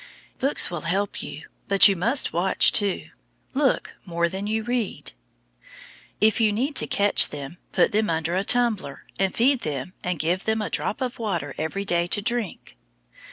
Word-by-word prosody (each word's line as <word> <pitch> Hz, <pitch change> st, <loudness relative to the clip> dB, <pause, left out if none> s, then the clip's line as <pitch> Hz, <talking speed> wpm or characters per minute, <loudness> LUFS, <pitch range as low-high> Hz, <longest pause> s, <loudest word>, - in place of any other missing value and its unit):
Books 275 Hz, -6 st, +3 dB
will 175 Hz, -3 st, -4 dB
help 195 Hz, +5 st, -2 dB
you, 145 Hz, +3 st, -8 dB, 0.2 s
but 200 Hz, -1 st, +8 dB
you 200 Hz, -, +2 dB
must 235 Hz, +10 st, +1 dB
watch, 175 Hz, +3 st, +3 dB
too. 200 Hz, -3 st, +1 dB, 0.4 s
Look 275 Hz, -1 st, 0 dB
more 170 Hz, -2 st, -1 dB
than 195 Hz, +3 st, -5 dB
you 220 Hz, +1 st, -1 dB
read. 240 Hz, -3 st, -3 dB, 1.1 s
If 220 Hz, +2 st, +3 dB
you 215 Hz, -2 st, +3 dB
need 265 Hz, +8 st, -2 dB
to -, -, +1 dB
catch 205 Hz, 0 st, +3 dB
them, 145 Hz, +4 st, -8 dB
put -, -, +2 dB
them 215 Hz, -1 st, 0 dB
under 165 Hz, +1 st, -1 dB
a 190 Hz, -, 0 dB
tumbler, 220 Hz, -, +1 dB
and 190 Hz, -1 st, +1 dB
feed 260 Hz, +3 st, +2 dB
them 150 Hz, -, -5 dB
and 180 Hz, -1 st, -2 dB
give 170 Hz, +5 st, -1 dB
them 220 Hz, 0 st, 0 dB
a 210 Hz, -, -4 dB
drop 220 Hz, -, -2 dB
of 250 Hz, -2 st, -4 dB
water 175 Hz, -10 st, -3 dB
every 160 Hz, +6 st, -4 dB
day 175 Hz, -2 st, +1 dB
to 205 Hz, -, +1 dB
drink. 220 Hz, -, -4 dB
200 Hz, 175 wpm, -24 LUFS, 170-220 Hz, 1.1 s, but